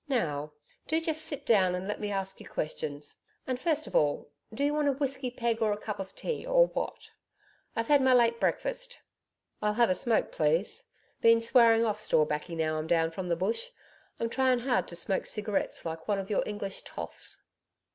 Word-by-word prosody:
Now, 150 - -1 0.3
do 320 +1 +2
just 315 -1 -1
sit 285 -2 -4
down 190 -5 +4
and 180 +1 -4
let 210 - -3
me 210 - -3
ask 195 -1 -2
you - - -11
questions. 150 -1 -4 0.3
And 255 -1 -2
first 310 0 +1
of - - -8
all, 145 0 +1 0.2
do 260 +6 -2
you 290 +1 +2
want 300 -1 +1
a 280 - +3
whiskey 270 -1 -2
peg 235 -2 -1
or 215 -1 +3
a 205 - 0
cup 210 -1 -5
of 195 0 -6
tea, 480 - -3
or - - +5
what? - - -5 0.6
I've 230 - 0
had 290 +2 +5
my 260 0 +4
late 235 -1 +4
breakfast.' - - -1 0.6
'I'll 210 0 +1
have 235 -3 +4
a - - +5
smoke, 230 +3 +1
please. 160 +5 0 0.4
Been 230 0 +6
swearing 230 -1 +5
off 215 -1 -1
store 155 -7 +3
baccy 150 +3 -3
now 155 -1 0
I'm 155 - -4
down 165 -1 +2
from 180 +1 -5
the 170 - +2
Bush. 220 - -1 0.5
I'm 230 - 0
trying 260 -1 +2
hard 245 0 +1
to 170 - -7
smoke 185 +3 -1
cigarettes 210 -4 -2
like 160 0 -5
one 205 -2 +1
of 195 +1 -4
your 205 - +2
English 205 -2 -4
toffs.' - - -5
220 Hz, 205 wpm, -29 LUFS, 180-260 Hz, 0.6 s, Been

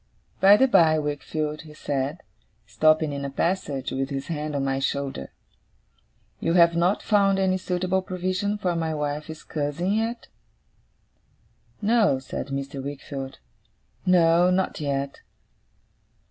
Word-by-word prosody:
'By 200 +2 +7
the 265 - +5
by, 160 -9 +5
Wickfield,' 150 +1 -3
he 155 -1 -13
said, 145 +3 -3 0.4
stopping 155 +8 +2
in 140 0 -4
a 140 - -3
passage 140 -3 -1
with 135 0 -2
his 135 +1 -5
hand 150 -2 -3
on 140 -1 0
my 135 0 0
shoulder; 135 - -3 1.1
'you 165 - 0
have 170 -1 +5
not 175 +4 +1
found 200 -2 +3
any 190 -1 +1
suitable 185 +1 0
provision 185 +2 -2
for 180 -4 -1
my 160 -1 -1
wife's 150 +1 -4
cousin 155 +5 -2
yet?' 225 +2 -2 1.6
'No,' 215 - +3
said 130 0 -6
Mr. 140 -1 -5
Wickfield. 135 -1 -6 0.7
'No. 175 -1 +4
Not 185 +1 0
yet. 140 -1 -2
155 Hz, 130 wpm, -25 LUFS, 140-185 Hz, 1.6 s, By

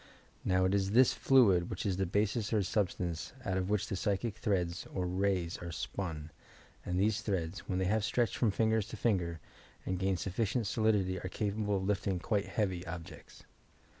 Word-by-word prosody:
Now, 95 0 +2
it 95 - +2
is 100 0 +1
this 125 +2 +6
fluid 100 -10 +4
which - - -4
is 95 -3 0
the 95 -1 0
basis 105 +3 0
or 105 -3 +2
substance 90 -5 -1
out 95 - 0
of 95 0 -1
which 105 -1 +1
the 105 - -5
psychie 100 +3 -1
threads 95 -6 -1
or 90 - -2
rays 90 -1 0
are 85 -1 -6
spun, 80 0 -4 0.5
and 90 0 -1
these 105 +2 +2
threads, 95 -3 -2
when 90 - 0
they 95 - +1
have 105 +3 +1
stretched 115 +2 +1
from 115 -4 +2
finfrer 110 +2 +2
to - - -7
finger, 85 -7 0 0.5
and 95 -1 -2
gained 95 0 +1
sufficient 105 +6 -1
solidity, 100 -3 +1
are 95 - -5
capable 105 +1 -1
of 95 - -3
lift 100 +1 0
ing 95 -2 +1
quite 100 +3 -1
heavy 95 -5 -1
objects. 85 -1 -9
95 Hz, 190 wpm, -33 LUFS, 90-105 Hz, 0.5 s, this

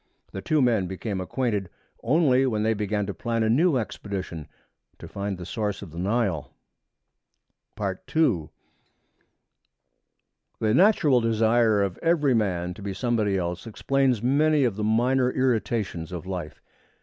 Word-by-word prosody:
The 95 - -6
two 155 +3 +2
men 110 -7 +2
became 95 +1 -4
acquainted 105 -2 -2 0.3
only 135 -1 +3
when 110 -4 0
they 110 +1 +2
began 105 -1 -1
to 100 - -4
plan 115 0 -2
a 110 - +2
new 155 +4 +3
expedition 95 -8 -5 0.5
to - - -10
find 100 -1 -4
the 90 - -8
source 105 +1 -3
of 90 - -10
the 85 - -8
Nile. 95 - -1 1.2
II 100 - 0 2.1
The 110 -1 +1
natural 160 - +4
desire 115 -1 +3
of 95 -3 -3
every 160 -5 +2
man 90 -6 0
to 100 - -13
be 100 -1 -5
somebody 110 -3 0
else 90 +3 -4
explains 130 0 0
many 150 +3 +3
of 120 -6 +1
the 105 - -3
minor 125 +4 +2
irritations 115 -9 -1
of 90 -1 -6
life. 90 -5 -6
110 Hz, 140 wpm, -25 LUFS, 95-125 Hz, 2.1 s, natural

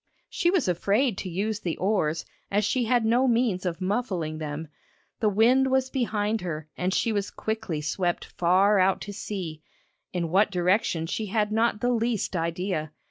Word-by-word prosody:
She 345 - +1
was 355 - +2
afraid 200 +7 +1
to 185 - -4
use 205 +4 -2
the 170 -5 -3
oars 165 -5 0 0.2
as 205 +1 +1
she 245 +2 +1
had 240 0 +2
no 245 +4 +3
means 230 -6 +1
of 170 -1 -3
muffling 185 -6 -2
them. 155 +1 -5 0.5
The 215 - +3
wind 245 +6 +4
was 260 0 +1
behind 220 -4 0
her 155 -3 -4
and 180 +1 -1
she 225 - +1
was 205 -2 -1
quickly 220 -8 -3
swept 175 +3 -1
far 190 +4 +3
out 185 +1 +3
to 205 - -6
sea, 180 -7 -5 0.5
in 170 -2 -2
what 195 +5 +4
direction 180 -2 +1
she 215 +6 -3
had 210 +1 0
not 225 0 +1
the 245 - +2
least 230 -4 0
idea. 165 -2 -2
200 Hz, 175 wpm, -26 LUFS, 175-225 Hz, 0.5 s, wind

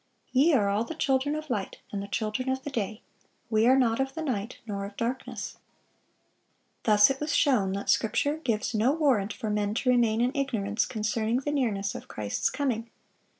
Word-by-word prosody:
Ye 280 +6 +4
are 205 -6 +3
all 200 +2 +1
the 325 - -6
children 280 0 +1
of 310 -2 -5
light, 205 -5 -2
and 200 - -3
the 200 - -6
children 215 +5 -2
of 265 0 -1
the 290 - -5
day: 215 -2 -3 0.5
we 220 +1 +4
are 260 +1 +6
not 235 -3 +2
of 270 +1 -1
the 320 - -3
night, 235 -6 -3
nor 200 -3 -4
of 200 0 -8
darkness."(614) 245 +3 -9
Thus 210 +2 +6
it 270 - -4
was 295 0 -1
shown 230 -12 +3
that 200 +1 -4
Scripture 285 +7 +2
gives 235 -8 -1
no 225 +5 +3
warrant 260 -10 +2
for 215 - -4
men 210 0 0
to 250 +2 +2
remain 230 -3 +3
in 245 +2 +2
ignorance 225 -7 -1
concerning 220 +2 -1
the 290 - -2
nearness 210 -9 0
of - - -8
Christ's 105 -1 -1
coming. 240 -5 -2
230 Hz, 195 wpm, -28 LUFS, 210-270 Hz, 0.5 s, are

